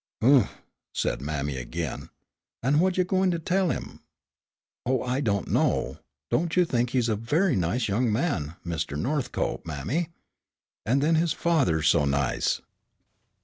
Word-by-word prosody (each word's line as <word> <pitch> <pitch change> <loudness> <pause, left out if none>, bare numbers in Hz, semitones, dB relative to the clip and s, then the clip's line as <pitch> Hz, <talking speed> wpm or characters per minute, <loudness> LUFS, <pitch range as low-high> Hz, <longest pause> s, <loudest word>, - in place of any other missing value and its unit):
"Oomph," 130 -3 +4 0.3
said - - -1
mammy 70 -1 -2
again, 80 +5 -4 0.5
"an' 140 +4 +3
whut 185 +1 +2
you 185 - +4
gwine 190 +1 +2
to 170 - 0
tell 180 +2 +1
him?" - - -4 0.8
"Oh, 130 +1 0
I 130 +2 -1
don't 100 - 0
know. - - +1 0.3
Don't 170 0 +1
you 180 - +6
think 120 -5 0
he's 125 -2 +1
a 110 - +1
very 150 - +1
nice 95 +7 0
young 110 +3 +1
man, 105 - -1
Mr. 80 -4 -3
Northcope, 135 - -1
mammy? 110 - -2 0.8
And 135 +5 +2
then 160 +2 +3
his 165 0 +2
father's 130 - +2
so 75 - +4
nice." 70 -2 0
125 Hz, 145 wpm, -26 LUFS, -, 0.8 s, you